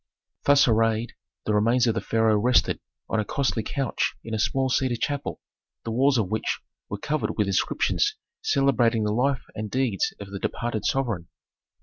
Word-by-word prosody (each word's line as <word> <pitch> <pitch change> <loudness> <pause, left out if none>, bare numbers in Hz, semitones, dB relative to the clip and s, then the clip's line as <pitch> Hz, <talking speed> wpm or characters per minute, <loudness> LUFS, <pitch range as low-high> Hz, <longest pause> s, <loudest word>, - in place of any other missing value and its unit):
Thus 145 -1 +6
arrayed, 115 0 +2 0.3
the 105 - +1
remains 115 +4 +3
of 115 - +2
the - - -2
pharaoh 110 -1 +2
rested 125 +4 +3 0.3
on 110 - 0
a - - +1
costly 125 +1 0
couch 135 +3 -1
in 115 - -6
a 110 - -1
small 135 +4 +1
cedar 130 -1 +1
chapel, 145 +3 -3 0.4
the 115 - -4
walls 135 +3 +3
of 105 -4 0
which 110 - -1 0.3
were 100 - -3
covered 150 +9 -2
with 105 - +2
inscriptions 100 - +1 0.3
celebrating 125 - +2
the 105 0 0
life 130 +3 +1
and 105 0 -5
deeds 125 -5 0
of 100 -1 -9
the 100 - -5
departed 110 -2 -3
sovereign. 115 -11 -1
115 Hz, 175 wpm, -25 LUFS, 110-135 Hz, 0.4 s, Thus